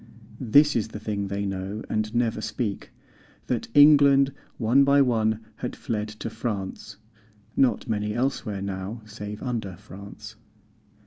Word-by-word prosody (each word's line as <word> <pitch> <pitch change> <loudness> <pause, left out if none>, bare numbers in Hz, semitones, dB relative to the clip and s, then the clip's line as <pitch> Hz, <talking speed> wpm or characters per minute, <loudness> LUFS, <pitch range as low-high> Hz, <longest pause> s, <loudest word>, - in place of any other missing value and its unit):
This 145 +5 +4
is 115 -3 0
the 105 - -8
thing 105 -2 -3
they 100 +1 -3
know 95 +2 -4
and 110 +1 -2
never 115 -2 +1
speak, 110 -2 -4 0.5
That 120 -3 -2
England 140 -2 +7 0.2
one 120 +4 +4
by 140 +1 +4
one 110 -3 +1 0.2
had - - -5
fled 105 -2 -3
to 105 +1 -6
France 105 -2 -5 0.6
(Not 130 -1 +2
many 105 -1 -1
elsewhere 120 -6 -2
now 100 +3 -5
save 105 -1 -8
under 115 -8 -3
France). 100 +1 -11
110 Hz, 135 wpm, -25 LUFS, 100-125 Hz, 0.6 s, England